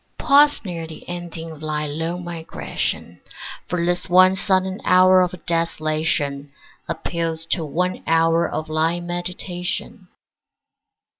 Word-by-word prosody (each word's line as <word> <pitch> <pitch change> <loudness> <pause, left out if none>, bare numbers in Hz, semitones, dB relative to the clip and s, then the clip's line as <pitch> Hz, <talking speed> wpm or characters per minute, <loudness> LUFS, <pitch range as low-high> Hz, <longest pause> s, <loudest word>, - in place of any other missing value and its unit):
Pause 290 -3 +4
near 170 -3 -5
the 160 - -11
ending 170 -2 -6
of 155 -1 -12
thy 155 -1 -2
long 165 +4 -3
migration; 170 -2 -4 0.5
For 175 -1 -1
this 175 +1 0
one 185 +1 +6
sudden 190 0 +1
hour 185 0 +6
of 180 -1 -3
desolation 155 -4 -1 0.4
Appeals 165 -1 -2
to 170 - 0
one 180 +5 -2
hour 165 +1 +3
of 155 - -3
thy 160 +2 0
meditation. 180 +3 -4
170 Hz, 120 wpm, -21 LUFS, 160-180 Hz, 0.5 s, one